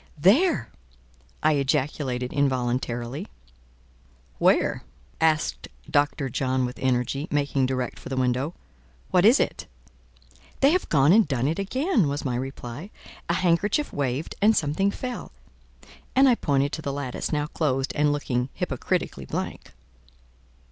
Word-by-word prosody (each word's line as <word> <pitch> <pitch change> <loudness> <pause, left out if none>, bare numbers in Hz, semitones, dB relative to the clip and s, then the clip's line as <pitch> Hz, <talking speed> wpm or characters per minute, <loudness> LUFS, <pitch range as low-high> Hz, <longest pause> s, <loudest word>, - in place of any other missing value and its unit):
"There!" 265 - +3 0.7
I 155 - +4
ejaculated 135 -3 -1
involuntarily. 125 - -1 1.1
"Where?", - - +3 0.4
asked 155 - +1 0.2
Dr. 145 -1 +1
John 130 0 0
with 125 - -6
energy, 130 +3 0
making 140 -2 +1
direct 130 -2 -3
for - - -9
the 135 - -3
window. 130 +5 0 0.6
"What, 180 +1 +4
is 235 +6 +7
it?" - - -1 0.9
"They 275 +2 +6
have 365 +2 0
gone 145 +2 +5
and 220 -3 +5
done 135 -2 0
it 160 +5 -1
again," 250 - +1
was 145 +1 -3
my 130 - 0
reply. 130 - -6 0.4
"A - - +2
handkerchief 190 - +1
waved 140 +1 -2
and 215 +2 +5
something 155 +6 +1
fell:" 250 +4 -6 0.8
and 270 +1 +6
I 255 - +6
pointed 140 -9 +1
to 155 - -4
the 140 - -3
lattice, 135 -3 -4
now 150 -1 0
closed 135 -4 -1
and 150 0 +3
looking 130 -3 -1
hypocritically - - -2
blank. - - -5
145 Hz, 135 wpm, -25 LUFS, 130-175 Hz, 1.1 s, is